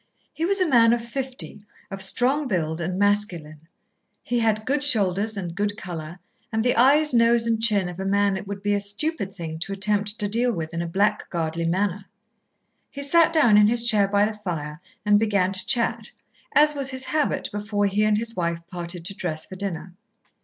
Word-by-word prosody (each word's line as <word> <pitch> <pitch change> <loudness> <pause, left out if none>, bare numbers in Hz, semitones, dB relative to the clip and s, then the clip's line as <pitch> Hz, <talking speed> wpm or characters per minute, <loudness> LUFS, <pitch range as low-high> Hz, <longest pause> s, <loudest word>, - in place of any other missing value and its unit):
He 325 - -2
was 395 +1 +1
a 370 - +2
man 235 -5 +5
of 235 -1 -2
fifty, 260 -3 -6 0.3
of 195 0 -5
strong 260 +9 0
build, 165 -6 -2
and 180 +2 -3
masculine. 175 -7 -1 0.6
He 240 0 -1
had 220 -1 0
good 285 +3 0
shoulders 210 -5 +1
and 175 -3 -4
good 205 +3 -2
colour, 170 -4 -7 0.3
and 220 +1 -1
the 245 - +2
eyes, 285 +4 +4
nose, 230 0 +4
and 225 -1 0
chin 205 -5 +3
of 180 0 -8
a - - -3
man 200 0 +2
it 190 +1 -6
would 200 0 -6
be 205 0 +1
a 200 - 0
stupid 205 - -3
thing 160 -3 -6
to 195 +4 -4
attempt 205 +1 -1
to 210 -2 -1
deal 235 +4 +1
with 160 -3 -5
in 170 - -2
a 170 - -3
blackguardly 165 -3 -1
manner. 195 +2 -1 0.8
He 280 - -5
sat 330 +3 +4
down 280 -10 +5
in 210 - +6
his 235 +1 +1
chair 210 -4 +3
by 200 +1 +2
the 215 - -3
fire 165 -7 -6 0.2
and 205 0 +4
began 200 -4 +1
to 190 -1 0
chat, 240 -3 0 0.5
as 300 +1 +5
was 275 -2 +1
his 260 -1 -1
habit 305 +2 -1
before 205 0 -1
he 200 +2 +1
and 215 0 +2
his 230 +1 -3
wife 170 -1 -2
parted 175 -1 -7
to 200 - -2
dress 165 -6 -3
for 190 - -10
dinner. 185 -2 -5
205 Hz, 205 wpm, -24 LUFS, 180-235 Hz, 0.8 s, in